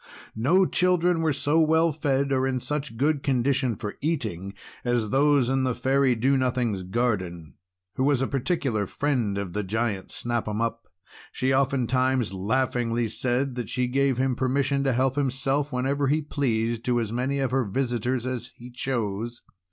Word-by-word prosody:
No 165 +13 +3
children 180 -2 +2
were 160 -1 +2
so 145 +3 +1
well 160 +1 +4
fed 140 -2 0
or 130 0 +2
in 130 -1 -1
such 140 -1 -3
good 145 +2 +1
condition 130 -2 +1
for 105 -2 -6
eating 110 - -2 0.3
as 120 -4 0
those 140 -2 +4
in 135 +1 +1
the 130 -2 0
Fairy 135 -1 +2
Do 130 +5 +2
Nothing's 125 -6 0
garden, 95 -5 -2 0.4
who 130 - +1
was 140 -2 +3
a 135 - +1
particular 135 - -1
friend 125 -8 -1
of 100 -3 -4
the 105 - -1
Giant 105 0 -2
Snap 120 -2 -2
'Em 105 0 -2
Up. 115 0 -2 0.4
She 130 +1 0
oftentimes 130 -3 +1
laughingly 115 +3 0
said 130 +4 -1
that 120 -1 -5
she 125 -1 0
gave 135 0 +1
him 130 -1 +1
permission 140 +2 +1
to 135 - +2
help 130 +2 +1
himself, 140 +1 0
whenever 135 +2 0
he 150 +3 +1
pleased, 115 -5 -1
to 120 -1 +2
as 110 -3 -2
many 130 +3 -1
of 135 -3 0
her 130 0 +2
visitors 120 +2 -1
as 130 -2 -4
he 125 +1 -11
chose. 120 -2 -3
130 Hz, 170 wpm, -26 LUFS, 115-140 Hz, 0.4 s, well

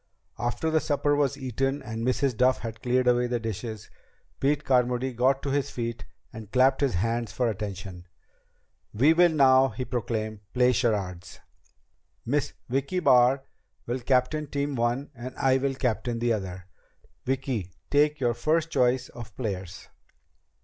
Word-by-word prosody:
After 120 +7 -1
the 160 - +3
supper 145 0 +1
was 145 -3 +1
eaten 135 +2 -2
and 110 +1 -5
Mrs. 130 +1 +1
Duff 130 +3 +3
had 110 -1 -6
cleared 125 0 +1
away 125 0 +3
the 120 -1 -1
dishes, 110 -1 -6 0.5
Pete 145 +2 +1
Carmody 125 0 +1
got 130 +3 +2
to 140 - -2
his 140 0 0
feet 115 -1 -5 0.3
and 110 -2 -10
clapped 130 +2 +3
his 135 -8 +1
hands 115 +4 -1
for 125 - 0
attention. 95 -4 -5 0.9
"We 140 +9 +5
will 175 +1 +5
now," 135 -4 +5
he 125 +3 -5
proclaimed, 110 -3 -3 0.2
"play 125 0 +4
charades. 100 -7 -2 0.9
Miss 145 +3 -1
Vicki 140 +8 -1
Barr 130 -3 +4 0.4
will 120 +2 -2
captain 130 +5 +1 0.3
one 120 -1 +1
team - - -23
and 125 0 -8
I 130 0 +3
will 135 0 -1
captain 120 -2 -1
the 120 0 +1
other. 95 -3 -5 0.6
Vicki, 130 -8 -2 0.2
take 150 +1 +3
your 120 -3 +1
first 155 +7 0
choice 125 0 +2
of 110 -4 -11
players." 95 -6 -5
125 Hz, 150 wpm, -27 LUFS, 115-135 Hz, 0.9 s, We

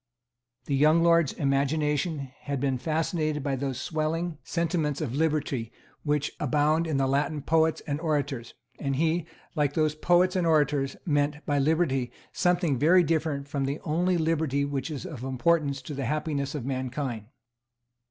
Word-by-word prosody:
The 140 - 0
young 155 +4 +4
lord's 170 -4 +4
imagination 145 +1 0
had 140 -2 -3
been 135 -1 0
fascinated 155 0 -1
by 140 -1 0
those 135 -1 -3
swelling 160 +2 -2
sentiments 165 -4 -1
of 140 -7 -3
liberty 145 -6 0 0.3
which 150 -1 0
abound 150 +3 +2
in 155 -4 0
the 135 - +2
Latin 140 +2 0
poets 160 0 +2
and 145 0 -3
orators; 145 -7 -2 0.2
and 140 -1 -1
he, 165 +3 +1 0.3
like 145 -3 0
those 155 -1 +2
poets 175 +4 +3
and 180 -2 +1
orators, 145 -3 +2
meant 150 -1 0
by 145 -1 +1
liberty 135 -4 +1 0.2
something 175 -7 +1
very 175 +5 +5
different 155 -3 -1
from 140 -2 -2
the 140 +3 -2
only 175 +3 +1
liberty 160 -4 +1
which 140 0 -3
is 150 -4 -5
of 135 -7 -7
importance 140 +1 +1
to 150 - -6
the 135 -1 -3
happiness 145 -2 -2
of 135 -5 -4
mankind. 130 -4 -3
150 Hz, 155 wpm, -27 LUFS, 140-160 Hz, 0.3 s, very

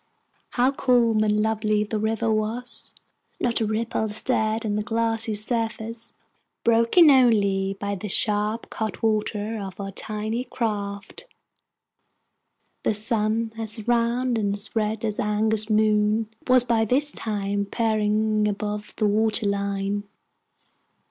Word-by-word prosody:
How 250 +2 +3
calm 240 -5 +2
and 210 0 +1
lovely 215 -1 0
the 215 +1 -3
river 220 +1 0
was! 225 +3 -4 0.5
Not 235 -1 0
a 220 - +1
ripple 220 0 -1
stirred 220 +1 0
on 210 - -1
the 210 - 0
glassy 225 0 0
surface, 225 +1 -3 0.5
broken 235 +8 +5
only 200 -7 +3
by 200 0 -3
the 200 +2 -5
sharp 210 +3 0
cutwater 215 0 -2
of 190 -1 -8
our 195 0 -5
tiny 220 +4 -3
craft. 205 - -4 1.5
The 215 - 0
sun, 220 +1 +1
as 220 0 -3
round 240 0 +1
and 200 -1 -1 0.2
red 220 0 -1
as 215 -1 -3
an 210 +1 0
August 220 0 +2
moon, 215 0 +2 0.2
was 255 -1 +5
by 230 -2 +1
this 275 +6 +3
time 200 -2 -2
peering 215 -1 +1
above 210 0 -4
the 215 - 0
water 215 0 +2
line. 200 0 -2
215 Hz, 125 wpm, -24 LUFS, 210-230 Hz, 1.5 s, broken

